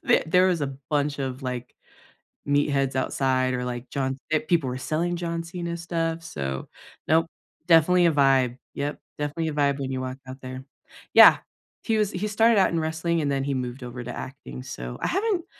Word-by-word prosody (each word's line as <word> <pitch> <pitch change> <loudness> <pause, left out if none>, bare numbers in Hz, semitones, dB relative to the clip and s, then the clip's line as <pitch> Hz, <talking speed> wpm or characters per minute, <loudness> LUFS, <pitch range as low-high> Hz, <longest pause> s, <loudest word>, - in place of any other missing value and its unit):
th - - +4
there 180 +3 +4
was 175 -4 0
a 135 -1 -2 0.2
bunch 145 -1 0
of, 130 0 -4
like, 125 -1 -5 0.7
meatheads 140 -2 +1
outside 130 -1 +1
or, 125 0 -3
like, 120 0 -5
John 135 0 -2
eh-people 155 -2 +1
were 125 - -3
selling 165 +6 -1
John 170 -1 -3
Cena 170 0 -5
stuff, 165 -1 -2
so 65 - -4 0.4
nope, 160 +1 +4 0.4
definitely 175 +2 +5
a 165 - +4
vibe 135 -4 +3 0.2
yep, 145 +1 -3 0.2
definitely 150 +2 -2
a - - -4
vibe 140 -1 +1
when 135 -1 -3
you 130 -1 -2
walk 130 0 -5
out 130 +1 -9
there 130 0 -7 0.5
yeah, - - +9 0.5
he 225 -2 +1
was 210 -1 +1
he 185 +4 -2
started 225 +2 +4
out 190 - +4
in 170 - 0
wrestling, 160 +1 -1
and 145 -2 0
then 135 -1 0
he 140 0 -1
moved 125 0 -4
over 125 0 -6
to 120 - -6
acting, 65 - -8
so - - -7
I - - 0
haven't 390 -3 0
145 Hz, 190 wpm, -25 LUFS, 130-170 Hz, 0.7 s, yeah